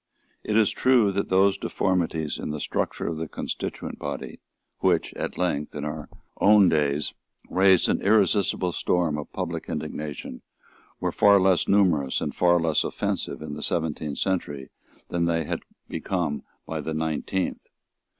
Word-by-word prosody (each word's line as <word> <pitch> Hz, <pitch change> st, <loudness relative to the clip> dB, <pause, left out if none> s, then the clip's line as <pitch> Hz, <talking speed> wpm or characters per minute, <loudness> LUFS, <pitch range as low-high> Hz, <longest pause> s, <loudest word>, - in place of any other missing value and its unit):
It 110 Hz, -, 0 dB
is 110 Hz, -3 st, +4 dB
true 120 Hz, -6 st, +4 dB
that 100 Hz, +1 st, -2 dB
those 95 Hz, +1 st, +4 dB
deformities 80 Hz, -4 st, -1 dB
in -, -, -4 dB
the 75 Hz, 0 st, -3 dB
structure -, -, -2 dB
of 80 Hz, -, -2 dB
the 80 Hz, 0 st, -3 dB
constituent -, -, -5 dB
body, 70 Hz, -1 st, -5 dB, 0.4 s
which, -, -, +1 dB
at -, -, -4 dB
length, 75 Hz, -5 st, -1 dB
in 75 Hz, 0 st, -4 dB
our 75 Hz, 0 st, -5 dB, 0.3 s
own 100 Hz, -2 st, +6 dB
days, 75 Hz, -2 st, +1 dB, 0.4 s
raised 95 Hz, -1 st, +5 dB
an -, -, +1 dB
irresistible 100 Hz, -3 st, +2 dB
storm 85 Hz, -2 st, +1 dB
of 75 Hz, -, -8 dB
public -, -, -4 dB
indignation, 75 Hz, -4 st, -5 dB, 0.6 s
were -, -, -1 dB
far 100 Hz, -1 st, +5 dB
less 95 Hz, -1 st, +3 dB
numerous 85 Hz, -10 st, +3 dB
and -, -, -3 dB
far 85 Hz, 0 st, +4 dB
less 80 Hz, -2 st, +2 dB
offensive -, -, -3 dB
in 75 Hz, -2 st, -6 dB
the 75 Hz, -, -6 dB
seventeenth 80 Hz, -3 st, -1 dB
century 75 Hz, -8 st, -2 dB, 0.4 s
than 85 Hz, -1 st, 0 dB
they 85 Hz, -1 st, +1 dB
had -, -, -3 dB, 0.3 s
become 85 Hz, -6 st, -2 dB, 0.3 s
in 80 Hz, -2 st, -4 dB
the 80 Hz, +1 st, -3 dB
nineteenth. 80 Hz, +4 st, -2 dB
85 Hz, 150 wpm, -25 LUFS, 75-95 Hz, 0.6 s, own